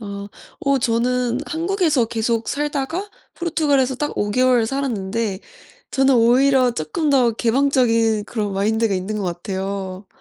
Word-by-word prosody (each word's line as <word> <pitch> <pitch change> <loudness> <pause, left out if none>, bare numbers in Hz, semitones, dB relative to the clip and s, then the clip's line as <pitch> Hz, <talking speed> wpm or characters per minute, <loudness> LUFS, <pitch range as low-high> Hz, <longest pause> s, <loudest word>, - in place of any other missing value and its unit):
아. 200 -1 -7 0.3
어 275 -1 +2
저는 245 +1 0
한국에서 325 - +1
계속 230 0 -1
살다가 295 +6 -2 0.3
포르투갈에서 290 -6 +1
딱 295 +3 -2
5 205 - -1
개월 250 0 +3
살았는데 225 -6 -2 0.5
저는 270 0 +3
오히려 250 +2 +4
쪼끔 195 - -2
더 250 -4 +3
개방적인 230 -3 +2
그런 210 -3 -3
마인드가 215 +2 +1
있는 190 +3 -3
것 200 - -3
같아요. 190 +1 -4
235 Hz, 295 characters per minute, -20 LUFS, 210-275 Hz, 0.5 s, 오히려